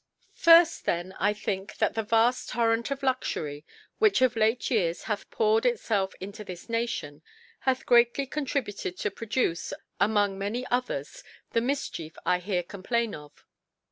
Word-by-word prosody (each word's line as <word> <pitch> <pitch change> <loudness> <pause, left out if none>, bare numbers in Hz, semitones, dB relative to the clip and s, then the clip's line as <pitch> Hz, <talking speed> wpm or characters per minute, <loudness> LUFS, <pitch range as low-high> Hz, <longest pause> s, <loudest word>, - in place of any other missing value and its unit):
FIRST 335 0 +6
then, 175 +2 -1
I 205 - +3
think, 205 -1 -4
that - - +1
the 225 - -1
vaft 230 +3 +2
Torrent 230 0 +1
of 275 0 -4
Luxury 155 - -2 0.4
which 430 -2 +4
of 250 -2 +3
late 225 +3 +1
Years 175 -8 +1
hath 210 -2 -4
poured 445 0 +2
itfelf 220 - 0
into 200 +3 -7
this 180 -3 -9
Nation, 230 -11 -3 0.5
hath 260 0 0
grcaily 240 +3 +3
contributed 250 -10 -3
to 210 - -2
produce, 225 -6 -1 0.3
among 205 -2 +2
many 220 +6 -2
others, 245 - -2 0.3
the 230 - +2
Mifchief 240 - -3
1 180 0 +2
here, 180 -1 -1
complain 215 +5 -2
of. 150 -1 -12
225 Hz, 145 wpm, -27 LUFS, 190-250 Hz, 0.5 s, FIRST